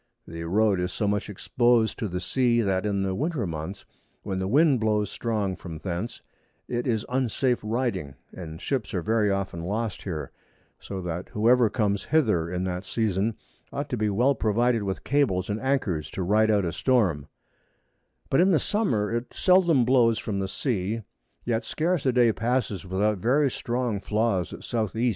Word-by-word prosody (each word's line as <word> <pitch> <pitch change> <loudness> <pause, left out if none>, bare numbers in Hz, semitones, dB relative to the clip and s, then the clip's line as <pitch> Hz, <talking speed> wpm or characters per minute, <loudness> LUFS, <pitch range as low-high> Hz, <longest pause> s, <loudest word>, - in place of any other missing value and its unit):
The 85 0 -6
Road 100 +2 +2
is 90 +1 -1
so 105 - -1
much 105 0 -1
exposed 120 +2 +1
to 110 - -1
the 90 -1 -3
sea, 120 +5 +2
that 95 -1 0
in 100 -1 0
the 95 -1 -1
Winter 145 - -1
Months, 80 +2 -6 0.4
when 95 -2 -3
the 95 - -1
Wind 140 +3 +4
blows 105 -2 +1
strong 105 -5 -1
from 85 -4 -8
thence, 95 +8 -5 0.4
it 120 +1 -2
is 115 -2 0
unsafe 125 0 0
Riding, 105 - -2 0.2
and 80 -3 -8
Ships 130 -8 -2
are 90 - -1
very 110 0 +2
often 95 -4 -2
lost 105 +3 -2
here; 80 -6 -5 0.5
so 95 -2 -6
that 90 0 -4
whoever 115 +2 +4
comes 100 -4 0
hither 105 - +2
in 90 0 -2
that 90 0 -3
Season, 105 0 0 0.4
ought 140 +1 -4
to - - -1
be 110 -1 +1
well 120 +8 +3
provided 115 0 +1
with 95 -1 -3
Cables 110 -10 +1
and 105 - -3
Anchors 110 - 0
to 95 - -4
ride 110 +4 +3
out 105 -3 +3
a 85 - -1
Storm: 95 - +1 1.0
But 135 - +4
in 185 - +4
the 175 - +4
Summer 125 - 0
it 120 +1 -3
seldom 175 -9 +4
blows 120 -3 +4
from 100 -3 -3
the 95 - -1
Sea; 110 0 -2 0.4
yet 115 -1 0
scarce 160 +4 -1
a - - +4
Day 120 -2 +4
passes 115 -5 -1
without 100 +2 0
very 135 +6 +2
strong 120 -4 -2
Flaws 105 -3 0
at - - -9
S. 110 -4 -1
110 Hz, 180 wpm, -26 LUFS, 95-125 Hz, 1.0 s, Wind